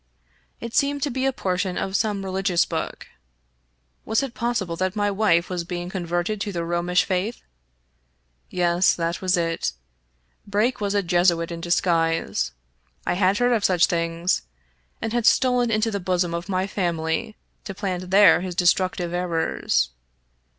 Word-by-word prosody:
It 235 Hz, 0 st, -7 dB
seemed 285 Hz, 0 st, +1 dB
to 290 Hz, -, 0 dB
be 260 Hz, +2 st, 0 dB
a -, -, +2 dB
portion 185 Hz, -5 st, -2 dB
of 190 Hz, 0 st, -2 dB
some 205 Hz, -2 st, 0 dB
religious' 190 Hz, -2 st, +1 dB
book. -, -, -5 dB, 1.0 s
Was 220 Hz, +5 st, +1 dB
it 265 Hz, -3 st, -4 dB
possible 235 Hz, -8 st, -2 dB
that 185 Hz, +2 st, -1 dB
my 205 Hz, -1 st, +1 dB
wife 190 Hz, -4 st, +2 dB
was 180 Hz, -2 st, -3 dB
being 175 Hz, +1 st, -5 dB
converted 175 Hz, +3 st, -2 dB
to 205 Hz, -, -2 dB
the 170 Hz, -3 st, -3 dB
Romish 175 Hz, +1 st, +1 dB
faith? 195 Hz, +5 st, -2 dB, 1.1 s
Yes, 175 Hz, 0 st, +2 dB
that 170 Hz, 0 st, -2 dB
was 185 Hz, 0 st, +2 dB
it. 165 Hz, -1 st, -1 dB, 0.7 s
Brake 210 Hz, +4 st, 0 dB
was 205 Hz, 0 st, -1 dB
a 200 Hz, -, +2 dB
Jesuit 175 Hz, -1 st, +2 dB
in 170 Hz, 0 st, -6 dB
disguise 165 Hz, -, +1 dB, 0.3 s
— 60 Hz, -, -39 dB
I -, -, +1 dB
had 185 Hz, +2 st, +2 dB
heard 245 Hz, +1 st, +3 dB
of 220 Hz, -3 st, +1 dB
such 180 Hz, -3 st, +4 dB
things 170 Hz, +1 st, 0 dB, 0.3 s
— -, -, -41 dB
and 225 Hz, -, -2 dB
had 240 Hz, -2 st, +1 dB
stolen 250 Hz, -2 st, +3 dB
into 220 Hz, 0 st, +1 dB
the 200 Hz, -, -2 dB
bosom 180 Hz, -2 st, 0 dB
of 170 Hz, +3 st, -4 dB
my 185 Hz, 0 st, 0 dB
family 170 Hz, 0 st, -2 dB, 0.3 s
to 195 Hz, -, -6 dB
plant 185 Hz, -2 st, -3 dB
there 195 Hz, -2 st, +6 dB
his 180 Hz, -1 st, -5 dB
destructive 175 Hz, 0 st, +1 dB
errors. 165 Hz, -, 0 dB
185 Hz, 165 wpm, -23 LUFS, 170-205 Hz, 1.1 s, there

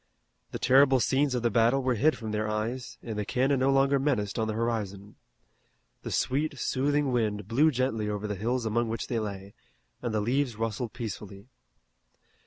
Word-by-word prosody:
The -, -, -5 dB
terrible 135 Hz, 0 st, +5 dB
scenes 135 Hz, +2 st, +1 dB
of 120 Hz, -, -2 dB
the 120 Hz, -, +2 dB
battle 120 Hz, +5 st, +3 dB
were 130 Hz, -1 st, +2 dB
hid 150 Hz, +8 st, +2 dB
from 110 Hz, -3 st, -5 dB
their 105 Hz, 0 st, -1 dB
eyes, 115 Hz, +4 st, -3 dB
and 110 Hz, -3 st, -4 dB
the -, -, 0 dB
cannon 135 Hz, +5 st, +1 dB
no 130 Hz, +1 st, +2 dB
longer 135 Hz, 0 st, +3 dB
menaced 120 Hz, -8 st, 0 dB
on 110 Hz, -, 0 dB
the 110 Hz, -, -2 dB
horizon. 105 Hz, -3 st, -3 dB, 0.9 s
The -, -, -6 dB
sweet, 145 Hz, +2 st, 0 dB
soothing 140 Hz, +2 st, 0 dB
wind 105 Hz, -4 st, -1 dB
blew 140 Hz, +8 st, +4 dB
gently 120 Hz, -6 st, -1 dB
over 105 Hz, 0 st, -3 dB
the 105 Hz, -, -2 dB
hills 115 Hz, +5 st, -1 dB
among 115 Hz, +2 st, 0 dB
which 115 Hz, 0 st, -3 dB
they 120 Hz, -, 0 dB
lay, 100 Hz, -2 st, -6 dB, 0.5 s
and 120 Hz, -, -2 dB
the 110 Hz, -, 0 dB
leaves 125 Hz, +3 st, 0 dB
rustled 115 Hz, +1 st, -3 dB
peacefully. 105 Hz, -2 st, -7 dB
115 Hz, 185 wpm, -28 LUFS, 105-130 Hz, 0.9 s, terrible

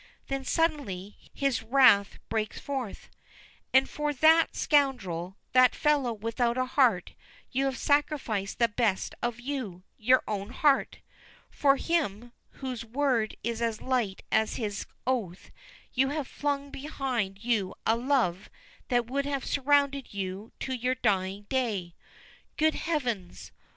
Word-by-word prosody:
Then, 275 Hz, 0 st, -2 dB
suddenly, 255 Hz, -, -1 dB, 0.2 s
his 275 Hz, -4 st, 0 dB
wrath 225 Hz, -4 st, +5 dB
breaks 215 Hz, -1 st, -2 dB
forth. 265 Hz, -7 st, -5 dB, 0.6 s
"And 265 Hz, +1 st, +5 dB
for 300 Hz, 0 st, -2 dB
that 320 Hz, +4 st, +5 dB
scoundrel, 200 Hz, -, +1 dB
that 255 Hz, -1 st, +5 dB
fellow 290 Hz, -5 st, +2 dB
without 230 Hz, +2 st, -1 dB
a 255 Hz, -, +1 dB
heart, 245 Hz, -9 st, +2 dB, 0.4 s
you 270 Hz, +2 st, +1 dB
have 270 Hz, -1 st, -1 dB
sacrificed 285 Hz, -9 st, 0 dB
the 235 Hz, -, +4 dB
best 215 Hz, -3 st, 0 dB
of 240 Hz, 0 st, -2 dB
you 245 Hz, -9 st, -5 dB, 0.2 s
your 255 Hz, +3 st, +4 dB
own 200 Hz, -1 st, -3 dB
heart! 275 Hz, +2 st, +2 dB, 0.5 s
For 275 Hz, -1 st, +3 dB
him, 245 Hz, -, -1 dB, 0.3 s
whose 250 Hz, -3 st, -3 dB
word 240 Hz, -2 st, 0 dB
is 235 Hz, +1 st, -2 dB
as 230 Hz, -2 st, -1 dB
light 240 Hz, -7 st, -1 dB
as 220 Hz, 0 st, +2 dB
his 205 Hz, -3 st, -3 dB, 0.2 s
oath, 220 Hz, -9 st, -2 dB, 0.4 s
you 265 Hz, +1 st, +3 dB
have 290 Hz, -2 st, -3 dB
flung 285 Hz, -1 st, -2 dB
behind 250 Hz, -9 st, -3 dB
you 220 Hz, -6 st, 0 dB
a 225 Hz, -, +4 dB
love 235 Hz, -8 st, 0 dB, 0.4 s
that 245 Hz, -2 st, +2 dB
would 275 Hz, +4 st, -2 dB
have 275 Hz, -2 st, -2 dB
surrounded 280 Hz, -3 st, +1 dB
you 195 Hz, +2 st, -4 dB
to 265 Hz, -, -2 dB
your 250 Hz, +1 st, 0 dB
dying 200 Hz, -4 st, 0 dB
day. 205 Hz, -7 st, -2 dB, 0.6 s
Good 315 Hz, 0 st, +3 dB
heavens! 245 Hz, -, -3 dB
245 Hz, 135 wpm, -28 LUFS, 210-275 Hz, 0.6 s, wrath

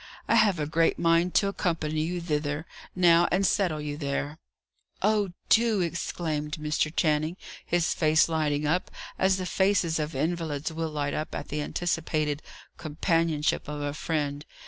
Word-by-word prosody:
I -, -, +2 dB
have 200 Hz, -4 st, +4 dB
a 150 Hz, -, 0 dB
great 165 Hz, +2 st, +2 dB
mind 170 Hz, +1 st, +2 dB
to 200 Hz, -, +4 dB
accompany 160 Hz, -5 st, -1 dB
you 175 Hz, +3 st, -2 dB
thither, 150 Hz, -1 st, -2 dB, 0.3 s
now, 175 Hz, -1 st, +5 dB
and 195 Hz, +2 st, +2 dB
settle 185 Hz, -6 st, +1 dB
you 150 Hz, -1 st, -4 dB
there." 145 Hz, +1 st, -3 dB, 0.6 s
"Oh, 205 Hz, -3 st, +2 dB
do!" 225 Hz, -3 st, +4 dB
exclaimed 160 Hz, -3 st, -3 dB
Mr. 155 Hz, -1 st, -1 dB
Channing, 155 Hz, +1 st, +1 dB, 0.3 s
his 175 Hz, -1 st, +1 dB
face 155 Hz, -1 st, +3 dB
lighting 150 Hz, -2 st, 0 dB
up, 170 Hz, +5 st, 0 dB, 0.3 s
as 190 Hz, 0 st, +3 dB
the 185 Hz, -, -3 dB
faces 185 Hz, -4 st, +1 dB
of 150 Hz, -1 st, -3 dB
invalids 160 Hz, 0 st, -2 dB
will 165 Hz, 0 st, -2 dB
light 145 Hz, -2 st, -2 dB
up 155 Hz, -, -3 dB
at -, -, -6 dB
the 150 Hz, +1 st, -2 dB
anticipated 155 Hz, -2 st, -1 dB, 0.4 s
companionship 160 Hz, -1 st, 0 dB
of 150 Hz, 0 st, -5 dB
a 145 Hz, 0 st, -2 dB
friend. 145 Hz, -2 st, -2 dB
160 Hz, 155 wpm, -27 LUFS, 150-175 Hz, 0.6 s, now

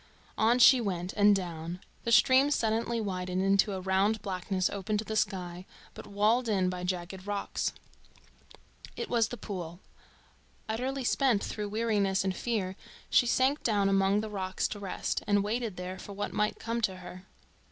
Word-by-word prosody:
On 230 Hz, +3 st, +3 dB
she 250 Hz, 0 st, +7 dB
went, 180 Hz, -4 st, -3 dB
and 205 Hz, 0 st, +5 dB
down. 170 Hz, -2 st, -4 dB, 0.3 s
The 235 Hz, -, 0 dB
stream 265 Hz, +4 st, +6 dB
suddenly 230 Hz, -3 st, 0 dB
widened 185 Hz, -3 st, -2 dB
into 195 Hz, +1 st, +3 dB
a 190 Hz, -, -3 dB
round 195 Hz, +3 st, +1 dB
blackness 185 Hz, 0 st, -1 dB
open 205 Hz, +2 st, -2 dB
to 215 Hz, -, -3 dB
the 220 Hz, -, -4 dB
sky, 180 Hz, -3 st, -2 dB, 0.3 s
but -, -, -10 dB
walled 215 Hz, +4 st, +2 dB
in 190 Hz, -3 st, +2 dB
by 180 Hz, -1 st, -5 dB
jagged 185 Hz, +1 st, -4 dB
rocks. 205 Hz, -1 st, -2 dB, 1.2 s
It 470 Hz, -, -5 dB
was 230 Hz, -3 st, +3 dB
the 245 Hz, -, -7 dB
pool. 175 Hz, -5 st, -6 dB, 0.9 s
Utterly 255 Hz, +5 st, -2 dB
spent 245 Hz, -4 st, +2 dB
through 210 Hz, -1 st, -4 dB
weariness 205 Hz, -3 st, +1 dB
and 190 Hz, -1 st, -1 dB
fear, 200 Hz, -6 st, -2 dB, 0.4 s
she 245 Hz, -, +5 dB
sank 265 Hz, +4 st, +2 dB
down 205 Hz, -3 st, +2 dB
among 195 Hz, +1 st, +3 dB
the 220 Hz, -, -5 dB
rocks 190 Hz, -2 st, -2 dB
to 205 Hz, -, -6 dB
rest, 195 Hz, -2 st, -3 dB
and 205 Hz, -1 st, +3 dB
waited 220 Hz, -1 st, -2 dB
there 180 Hz, +1 st, -6 dB
for 200 Hz, -, -9 dB
what 205 Hz, +1 st, -4 dB
might 210 Hz, 0 st, 0 dB
come 230 Hz, +1 st, -3 dB
to 190 Hz, -4 st, 0 dB
her. 185 Hz, +1 st, -11 dB
200 Hz, 170 wpm, -30 LUFS, 185-225 Hz, 1.2 s, she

